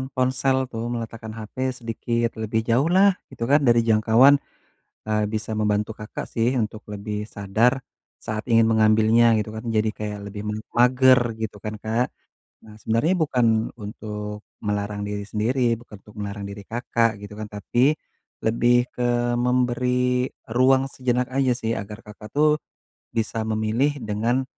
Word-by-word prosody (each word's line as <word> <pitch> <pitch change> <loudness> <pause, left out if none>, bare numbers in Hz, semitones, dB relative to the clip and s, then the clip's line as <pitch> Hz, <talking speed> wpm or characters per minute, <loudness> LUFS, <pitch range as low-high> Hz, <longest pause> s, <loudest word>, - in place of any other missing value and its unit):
ponsel 130 +1 +1
tuh, 115 -1 -4
meletakkan 115 -1 -6
HP 110 - -10 0.2
sedikit 115 0 -1
lebih 110 +1 0
jauhlah, 170 +12 +5 0.2
gitu 120 -3 -6
kan, 145 - +6
dari 120 0 +5
jangkauan, 115 +5 +6 0.7
e - - -2 0.2
bisa 110 0 -3
membantu 105 0 0
Kakak 105 0 -6
sih, 115 +1 +2
untuk 110 0 -4
lebih 105 +1 -4 0.2
sadar, 105 +5 +2 0.5
saat 110 0 -4
ingin 115 -1 +5
mengambilnya, 110 +1 +4
gitu 105 - -3
kan, 110 - -6
jadi 110 +1 +2
kayak 105 -1 -4
lebih 105 +1 -7
me - - -1 0.2
mager, 130 +1 +6 0.2
gitu 105 -2 -4
kan 110 -1 -4
Kak? 115 +3 +1 0.6
Nah 105 -1 -13
sebenarnya 115 +11 +1
bukan 130 -6 +2 0.3
untuk 105 -1 -6 0.2
melarang 105 0 -2
diri 105 0 -3
sendiri, 115 +2 +1
bukan 115 -3 -13
untuk 105 +1 -17
melarang 100 0 -5
diri 100 0 -8
Kakak, 115 -2 0
gitu 105 0 -9
kan, 110 - -4
tapi, 120 +7 +2 0.5
lebih 120 +2 +3 0.2
ke 125 - -2 0.4
memberi 125 +1 +1 0.2
ruang 130 +2 +4
sejenak 125 -1 -1
aja 135 -1 +2
sih, 115 -2 -2
agar 105 +3 -7
Kakak 105 0 -11
tuh, 150 +1 +4 0.6
bisa 115 0 -1
memilih 110 +6 +1
dengan 115 +5 0
115 Hz, 145 wpm, -23 LUFS, 105-125 Hz, 0.7 s, kan